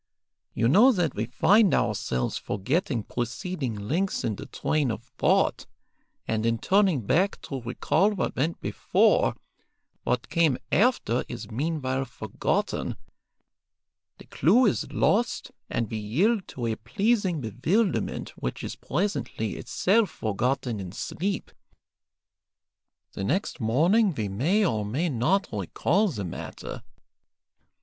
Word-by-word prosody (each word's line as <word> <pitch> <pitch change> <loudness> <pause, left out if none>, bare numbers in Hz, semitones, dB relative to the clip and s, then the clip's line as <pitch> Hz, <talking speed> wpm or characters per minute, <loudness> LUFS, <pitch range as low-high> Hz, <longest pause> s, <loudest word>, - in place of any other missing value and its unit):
You 115 - +2
know 215 - +7
that 175 - 0
we 110 +2 -2
find 200 - +4
ourselves 100 - -1
forgetting 120 - -1
preceding 125 - -3
links 155 - -1
in 110 - -1
the - - -9
train 150 -4 0
of 110 0 -4
thought, - - +1 0.6
and 110 -1 0
in 115 0 +1
turning 190 - +3
back 180 - +1
to 135 -3 -5
recall 125 - +1
what 205 -4 -2
went 155 +6 -1
before, - - +2 0.7
what 125 0 -1
came 160 -6 +2
after 210 - +2
is 120 -2 -7
meanwhile 135 0 -1
forgotten, - - -2 1.2
the - - -14
clue 215 - +4
is 210 - 0
lost, 235 +4 +1 0.2
and 115 -1 -1
we 110 - -2
yield 185 - +1
to 120 - -5
a 115 -1 -1
pleasing 190 - 0
bewilderment 155 - 0
which 60 - -5
is - - -5
presently 145 - -2
itself 205 +1 +1
forgotten 120 +1 -1
in 95 -2 -6
sleep. 190 - -3 1.6
The 95 - -5
next 175 - -1
morning 165 - +3
we 105 -5 -2
may 165 - +2
or 110 - 0
may 135 +12 -1
not 160 - +1
recall 145 - +1
the 110 - -4
matter. 85 - -7
135 Hz, 125 wpm, -26 LUFS, 115-190 Hz, 1.6 s, know